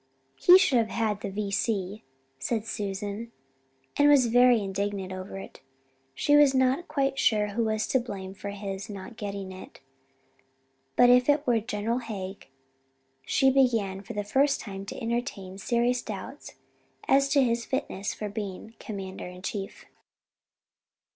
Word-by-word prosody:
"He 360 - +8
should 275 -10 +3
have 225 - +1
had 215 -3 -1
the - - -3
V.C.," 200 0 -2 0.4
said 220 - -2
Susan, 205 +1 -4 0.6
and 290 0 +5
was 280 -4 +6
very 245 0 +5
indignant 195 -1 -3
over 185 +1 -7
it. 195 - -10 0.5
She 290 - +3
was 290 -2 +6
not 260 +5 +2
quite 275 -3 0
sure 210 -2 +2
who 225 +3 -1
was 220 0 0
to 260 - +3
blame 195 -6 -6
for 200 +1 -7
his 200 0 -6
not 200 +3 -8
getting 200 -2 -5
it, 185 0 -11 1.2
but 245 0 +7
if 250 +2 +5
it 290 0 +3
were 240 -2 +3
General 225 +1 -2
Haig 195 -5 -7 0.8
she 270 0 +4
began 225 -8 +2
for 200 - -8
the 205 - -2
first 275 +7 +2
time 195 -1 -7
to - - -6
entertain 230 -6 -4
serious 240 +3 +1
doubts - - -8 0.5
as 275 +1 +4
to 280 -1 +4
his 235 -1 0
fitness 200 -7 -3
for 210 - -5
being 205 +1 -6
Commander 190 -3 -6
in 180 +1 -11
Chief. 195 -1 -5
215 Hz, 150 wpm, -27 LUFS, 195-250 Hz, 1.2 s, He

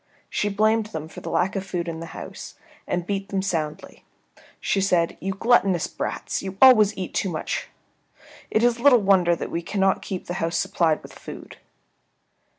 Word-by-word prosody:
She 205 - 0
blamed 215 +2 +2
them 160 -7 -6
for - - -11
the - - -6
lack 185 +3 0
of 195 - -2
food 180 -3 -4
in 165 -1 -4
the 165 - -7
house, - - -8 0.3
and 175 -1 -1
beating 195 0 -3
them 195 -2 -1
soundly, 160 -6 -4 0.6
she 195 - 0
said, 175 -3 +2
"You 195 - -2
gluttonous 195 -5 +3
brats; - - -4
you 190 0 -6
always 215 -6 +7
eat 185 -2 -5
too 195 - 0
much. 160 -3 -3 0.8
It 220 - +1
is 240 0 +3
little 260 0 +7
wonder 185 -3 +4
that - - -6
we 170 - -2
cannot 195 +2 +1
keep 185 -2 -5
the 175 - -4
house 165 0 0
supplied 160 -2 +1
with - - -12
food." - - -10
190 Hz, 180 wpm, -24 LUFS, 170-205 Hz, 0.8 s, always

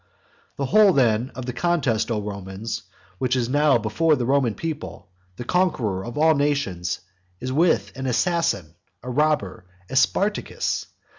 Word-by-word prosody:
The 140 - -2
whole 205 +5 +5
then 120 -3 +2
of 130 - -6
the 125 - -4
contest, 125 -8 0
O 110 -2 0
Romans, 100 +2 -5 0.4
which 130 0 +1
is 120 -2 0
now 145 -1 +4
before 120 +9 +2
the 125 - -2
Roman 130 -4 +2
people, 155 - -6 0.2
the 120 - -6
conqueror 125 - 0
of 120 +4 -7
all 160 +1 +5
nations, 140 - -1 0.4
is 130 +1 -4
with 165 +4 +2
an 130 0 -4
assassin, 165 - 0 0.3
a 125 - -5
robber, 130 -11 0 0.2
a - - -4
Spartacus. 205 +9 0
130 Hz, 150 wpm, -23 LUFS, 110-155 Hz, 0.4 s, whole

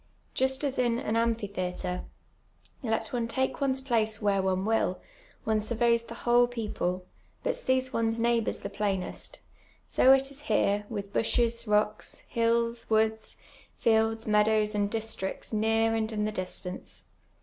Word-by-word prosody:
Just 265 +2 0
as 275 -3 -1
in 240 -2 +2
an 225 -2 -2
amphitheatre, 200 -6 -1 0.8
let 225 -2 -2
one 235 -2 0
tidvc 260 +4 -1
ones 265 -1 +1
place 220 -5 +1
where 200 -2 +2
one 190 0 0
will, 220 -4 +1 0.4
one 220 -1 +1
sur 215 +3 -3
veys 235 0 +2
the 230 - -7
whole 240 0 +5
people, 205 -6 -3 0.4
but - - 0
sees 260 0 0
one's 225 0 +1
nei<>:hboui 230 -1 +2
s - - -1
the 200 - -5
i)lainest, 195 -3 -2 0.5
60 - - -1
it 270 +1 +6
is 280 +1 -8
here 205 -4 +1
with 200 -2 -5
bushes, 235 0 +1
rocks, 210 0 0
hills, 230 0 +1
woo<ls, 220 0 +1 0.4
fields, 225 0 +2
meadows, 210 0 +3
and 205 -1 +1
districts 220 -2 -4
near 225 +1 +2
and 220 0 -1
in 210 -1 -1
the 215 - -1
distimce. 185 -1 -5
225 Hz, 150 wpm, -29 LUFS, 210-235 Hz, 0.8 s, it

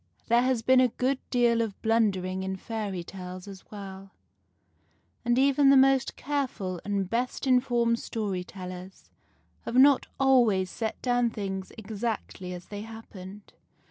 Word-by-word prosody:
There 235 +1 +5
has 255 -2 +1
been 260 +2 +5
a 255 - +5
good 255 +3 -1
deal 235 -2 +3
of 220 -4 -4
blundering 195 -5 +1
in 190 0 -3
fairy 200 -3 -4
tales 185 +1 -8
as 195 -1 -11
well, 195 -2 -9 1.1
and 240 0 +2
even 275 +1 +4
the 275 - +7
most 270 0 +4
careful 245 - -3
and 200 -2 -1
best 240 +7 -2
informed 240 -2 +2
story 200 -5 -3
tellers 185 0 -10 0.5
have 235 - -5
not 270 +1 +6
always 235 -9 +3
set 220 -2 -4
down 245 -1 +2
things 195 -3 -5
exactly 215 -3 -4
as 180 -1 -7
they 205 -1 -6
happened. 210 -3 -11
220 Hz, 140 wpm, -28 LUFS, 190-245 Hz, 1.1 s, the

